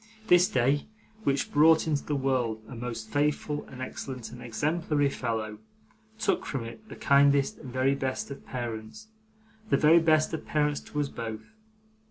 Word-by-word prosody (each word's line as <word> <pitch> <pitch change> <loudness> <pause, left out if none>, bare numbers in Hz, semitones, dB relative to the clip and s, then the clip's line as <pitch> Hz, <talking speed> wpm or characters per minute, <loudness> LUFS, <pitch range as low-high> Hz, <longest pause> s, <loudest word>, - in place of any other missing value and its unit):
This 180 +2 +6
day, 140 - +1 0.4
which 140 0 0
brought 160 +2 +5
into 150 -3 0
the 150 - -2
world 125 -5 0
a 125 - -9
most 115 -2 -6
faithful 150 0 0
and 130 -1 -7
excellent 130 -2 -6
and 120 - -10
exemplary 145 +4 0
fellow, 110 -4 -3 0.6
took 220 - 0
from 135 -4 -3
it 115 - -10
the - - -8
kindest 140 -1 +3
and 130 - -9
very 130 +2 +2
best 135 0 -3
of 140 - -8
parents, 120 - -6 0.6
the - - +4
very 160 +3 +6
best 155 -1 +3
of 160 - -3
parents 150 -1 0
to 150 - -6
us 145 - +1
both. 110 - -7
140 Hz, 165 wpm, -28 LUFS, 120-150 Hz, 0.6 s, This